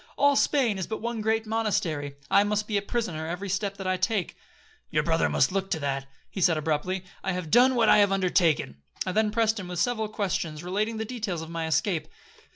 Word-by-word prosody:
All 285 0 +4
Spain 250 -9 +2
is 185 - -3
but 220 - -4
one 235 -1 -3
great 220 +1 +1
monastery,—I 165 -8 0
must 210 0 -1
be 215 - -2
a 200 - +2
prisoner 200 -8 -3
every 180 +4 -4
step 200 +1 -2
that 195 - -7
I 185 0 +1
take.'—'Your 195 0 -3
brother 75 -1 +2
must 75 - +2
look 195 0 -2
to 160 - -1
that,' 140 -1 -2 0.3
said 170 -2 +4
he - - -2
abruptly; 160 +5 -1 0.2
'I 190 - -1
have 180 -4 -5
done 255 +2 +6
what 230 -2 +3
I - - +7
have 200 -1 +4
undertaken.' 180 - +2 0.3
I 185 - -1
then 215 +2 +2
pressed 220 0 +1
him 185 - -6
with 180 0 -5
several 220 +1 0
questions 175 -7 -2
relating 210 +5 -1
to 220 - -2
the - - -6
details 210 -8 -4
of 160 - -9
my 165 -1 -3
escape. 160 +2 0
195 Hz, 215 wpm, -27 LUFS, 165-220 Hz, 0.3 s, I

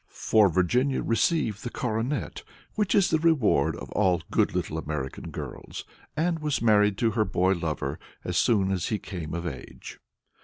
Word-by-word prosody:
For 110 -3 +3
Virginia 120 - +1
received 115 - +1
the 120 - -3
coronet, 120 +4 -2 0.3
which 210 -2 0
is 200 -3 +4
the 160 - +3
reward 110 - +3
of - - -9
all 90 -5 +2
good - - +2
little 80 - -2
American 75 -4 -5
girls, - - -7 0.3
and 165 +1 +1
was 150 -2 -1
married 105 -3 +3
to 115 -2 +2
her 110 +1 +2
boy 95 -2 +1
lover 75 -5 -3 0.2
as - - -3
soon 100 -4 +3
as 90 -4 -1
he 110 - 0
came 85 -5 -6
of 85 0 -4
age. 70 -7 -8
105 Hz, 165 wpm, -27 LUFS, 85-125 Hz, 0.3 s, is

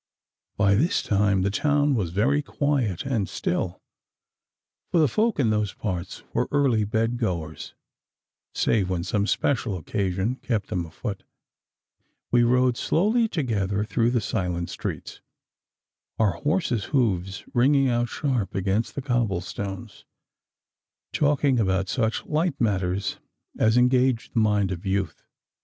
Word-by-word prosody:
By 100 -1 +4
this 155 - +2
time 100 -2 +2
the 100 - +1
town 145 +5 +2
was 100 -9 0
very 120 - +2
quiet 135 - -1
and 115 -8 -1
still, 90 0 -2 1.1
for 170 - +2
the 155 - +5
folk 220 - 0
in 115 -5 +3
those 105 -2 0
parts 95 -3 -4
were - - +1
early 135 -7 +2
bed 115 +3 0
goers, 85 -8 -4 0.8
save 100 -5 +1
when 90 -2 -1
some 100 +1 0
special 115 -7 0
occasion 95 +7 -2
kept 110 -7 -2
them 90 -5 -2
afoot. 100 +5 -6 1.1
We 120 - +5
rode 125 +1 +3
slowly 220 +7 +2
together 105 - -1
through 115 +2 +1
the 120 -1 +1
silent 90 -5 -2
streets, - - -6 1.0
our 110 -3 +3
horses' 125 - -1
hoofs 95 - 0
ringing 135 +2 +4
out 120 -1 +1
sharp 130 -9 -2
against 95 +4 -1
the 140 - -4
cobble 120 -9 0
stones, 95 0 -7 1.1
talking 145 -3 +2
about 95 -2 +1
such 110 -3 -1
light 155 -1 0
matters 95 -3 0 0.4
as 110 +2 +4
engage 125 -1 +2
the 115 - 0
mind 105 -3 +2
of 85 -2 -5
youth. 95 -4 -2
110 Hz, 135 wpm, -25 LUFS, 95-130 Hz, 1.1 s, the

